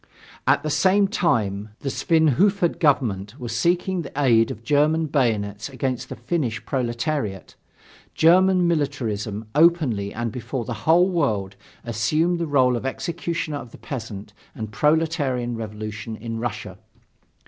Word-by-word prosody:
At 140 - +3
the 155 - -2
same 195 +6 +3
time, 105 - -1
the 140 - -2
Svinhufvud 170 - +2
government 120 - +1
was 120 -2 -4
seeking 175 +6 +1
the 145 - -8
aid 115 -5 +4
of 110 - -7
German 150 +5 +2
bayonets 110 -7 -1
against 130 -2 -3
the - - -5
Finnish 120 -2 -2
proletariat. 120 - -2 0.6
German 180 +2 +5
militarism, 115 -9 -2
openly 150 -11 +3
and 120 0 -3
before 125 +1 -4
the 120 - -4 0.2
whole 175 +3 +6
world, 105 - 0 0.3
assumed 155 - +1
the 170 - -1
role 130 -4 +3
of 120 - -4
executioner 160 +2 -3
of 120 -4 -9
the - - -13
peasant 110 -6 -7 0.2
and 110 -2 -6
proletarian 140 -1 +1
revolution 110 +1 -6
in 115 +1 -5
Russia. 120 +1 -5
130 Hz, 135 wpm, -23 LUFS, 110-160 Hz, 0.6 s, whole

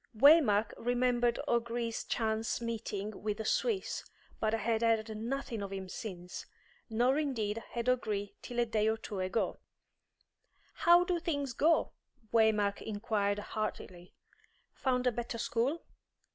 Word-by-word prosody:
Waymark 245 -6 +6
remembered 245 0 +1
O'Gree's 235 -1 -1
chance 220 -1 -1
meeting 215 -3 -4
with 210 -1 -2
the 220 - -4
Swiss, 430 - 0 0.4
but 215 - +1
had 225 0 0
heard 225 -1 +1
nothing 235 0 -3
of 200 -1 -5
him 190 -1 -5
since; 180 -4 -7 0.4
nor 245 +6 +2
indeed 230 -7 -1
had 235 0 -2
O'Gree 215 -5 0
till 245 -1 -4
a 240 - +4
day 220 -2 +1
or 220 0 +2
two 210 -3 -6
ago. 185 +4 -1 1.1
"How 345 +1 +6
do 355 -1 0
things 285 -6 -2
go?" 320 +7 +3 0.4
Waymark 215 -3 +3
inquired 205 -1 -1
heartily. 205 -4 -5 0.6
"Found 255 -1 0
a 250 - +4
better 235 0 -4
school?" 245 +8 0
230 Hz, 130 wpm, -32 LUFS, 210-245 Hz, 1.1 s, Waymark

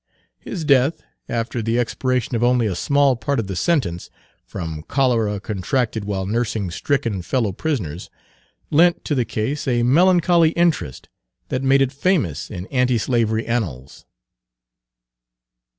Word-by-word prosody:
His 170 -6 -6
death, 140 +1 +3 0.3
after 115 0 -2
the 115 +2 0
expiration 125 0 -1
of 115 - 0
only 125 -1 +3
a 100 - 0
small 140 +7 +2
part 140 +4 -2
of 115 - -2
the 95 -1 -5
sentence, 90 - -1 0.4
from 80 -2 -5
cholera 115 -6 +1
contracted 110 +2 -2
while 95 -2 -2
nursing 110 -3 -2
stricken 115 -2 -1
fellow 110 +3 -1
prisoners, 95 - -3 0.6
lent 170 +3 +3
to - - -1
the 125 -4 +1
case 130 +9 -3
a 120 -2 +1
melancholy 170 +3 +4
interest 165 - 0 0.4
that 130 - -1
made 135 0 +4
it 130 - -1
famous 140 - 0
in 90 -3 -6
anti 125 -2 +2
slavery 115 -1 0
annals. 80 - -4
120 Hz, 135 wpm, -21 LUFS, 105-140 Hz, 0.6 s, melancholy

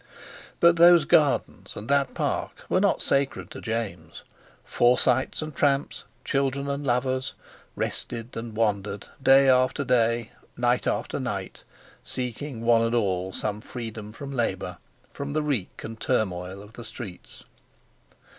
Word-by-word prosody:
But 170 0 +6
those 170 -1 +7
Gardens 150 -2 +2
and 105 - -7
that 140 -1 +1
Park - - -2
were - - +3
not - - +2
sacred 140 0 0
to - - -8
James. 100 -8 -4 0.4
Forsytes 125 +3 +2
and 155 -2 -7
tramps, 140 0 0 0.2
children 140 0 0
and 140 +1 -2
lovers, 130 0 0 0.4
rested 115 +1 -3
and 115 -1 -6
wandered 105 -2 -1 0.2
day 135 +1 +6
after 130 +2 +3
day, 115 -2 +2 0.3
night 120 0 +1
after - - -1
night, - - -4 0.4
seeking 125 0 -4
one 115 -1 +5
and 115 +1 +1
all 95 -4 0
some 105 +1 -3
freedom 110 -3 -7
from 140 +5 -8
labour, 120 -3 -2 0.3
from 140 0 -5
the 155 0 0
reek 135 -11 -2
and 115 0 -7
turmoil 95 -1 -1
of 105 +2 -15
the 120 - -9
streets. 110 -6 -10
120 Hz, 135 wpm, -26 LUFS, 110-140 Hz, 0.4 s, those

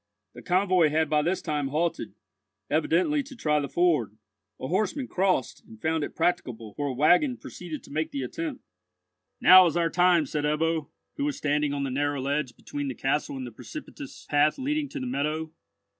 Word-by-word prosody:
The 120 - -11
convoy 180 -2 +3
had 155 0 0
by 150 -1 +4
this 175 +5 -1
time 150 -4 -1
halted, 160 +5 -2 0.6
evidently 300 -5 +2
to 275 0 -11
try 150 -9 +1
the 140 -1 -3
ford. 150 - +1 0.4
A - - -4
horseman 215 - -1
crossed, 185 - 0
and 110 - -14
found 160 +2 0
it - - -6
practicable, 130 -11 -1
for 145 +5 -3
a 135 - -2
waggon 180 - +4
proceeded 170 -4 -8
to - - -14
make 155 +2 -1
the 280 - -4
attempt. 315 -5 -5 0.8
"Now 185 -1 +9
is 170 - -1
our 165 -1 +1
time," 175 -3 +4
said 145 +2 -3
Ebbo, 155 +1 0 0.3
who 285 - -1
was 290 - -2
standing 150 0 0
on 140 -1 -2
the 135 - -2
narrow 145 +1 -1
ledge 140 -1 -2
between 145 -1 -5
the 130 - -4
castle 135 0 -1
and 130 - -5
the 120 - -8
precipitous 295 - -10
path 150 0 +3
leading 290 +2 -1
to 285 - -6
the 260 - -4
meadow. 155 - -2
155 Hz, 190 wpm, -27 LUFS, 145-185 Hz, 0.8 s, Now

